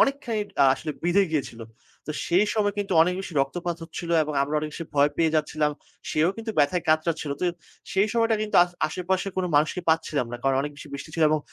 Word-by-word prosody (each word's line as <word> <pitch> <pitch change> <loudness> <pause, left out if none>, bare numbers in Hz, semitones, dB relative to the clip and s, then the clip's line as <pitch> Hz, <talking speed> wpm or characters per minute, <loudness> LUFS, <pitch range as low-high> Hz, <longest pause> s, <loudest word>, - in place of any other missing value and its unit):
অনেকখানি 260 -6 +1 0.2
আ - - +7
আসলে 155 - -5
বিঁধে 175 +4 +3
গিয়েছিল। 135 -6 -3 0.5
তো - - -4 0.2
সেই 185 +5 +4
সময় 205 -2 +1
কিন্তু 200 -2 -2
অনেক 180 +2 +1
বেশি 190 - -7
রক্তপাত 170 +4 -3
হচ্ছিল 165 +1 -6
এবং 150 - -3
আমরা 145 +2 -2
অনেক 150 0 -4
বেশি 165 - -5
ভয় 145 +1 +4
পেয়ে 160 -1 +2
যাচ্ছিলাম, 150 0 0 0.4
সেও 155 +3 +2
কিন্তু 225 0 -4
ব্যথায় 150 +5 +3
কাতড়াচ্ছিল। 155 -1 +1
তো - - 0 0.5
সেই 195 +2 +3
সময়টা 230 -1 +2
কিন্তু 215 - 0
আস 180 - -11 0.2
আশেপাশে 185 +4 -1
কোনো 185 - 0
মানুষকে 155 +5 +2
পাচ্ছিলাম 160 -5 +1
না। 120 - -3
কারণ 135 -1 +2
অনেক 145 +1 -4
বেশি 145 - -11
বৃষ্টি 140 +2 -7
ছিল 165 - 0
এবং 155 - +3
165 Hz, 210 wpm, -25 LUFS, 150-190 Hz, 0.5 s, আ